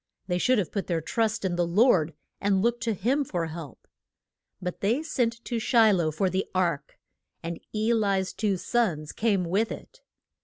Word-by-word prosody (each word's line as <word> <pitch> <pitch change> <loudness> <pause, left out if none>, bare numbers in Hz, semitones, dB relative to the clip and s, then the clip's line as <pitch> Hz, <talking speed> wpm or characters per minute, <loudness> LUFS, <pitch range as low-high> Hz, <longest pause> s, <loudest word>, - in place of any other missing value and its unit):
They 180 -2 -1
should 255 +6 +3
have 195 -5 -1
put 200 - -3
their 170 -2 0
trust 220 +5 -1
in 175 -2 -1
the 175 -1 +1
Lord, 170 - +3 0.2
and 195 -1 +1
looked 235 0 +1
to 225 -2 0
him 260 +10 +1
for 175 -10 -2
help. 160 -4 -9 0.7
But 180 -1 -5
they 235 +10 +1
sent 235 -6 -1
to 235 -2 -2
Shi 225 -1 +5
loh 170 -4 +1
for 155 +5 0
the 185 +1 -1
ark, 170 -6 -1 0.5
and 165 0 -4
E 220 +2 +1
li's 195 -4 +1
two 205 -3 0
sons 175 -9 0
came 205 -5 +1
with 200 +6 0
it. - - -10
195 Hz, 185 wpm, -27 LUFS, 175-230 Hz, 0.7 s, Shi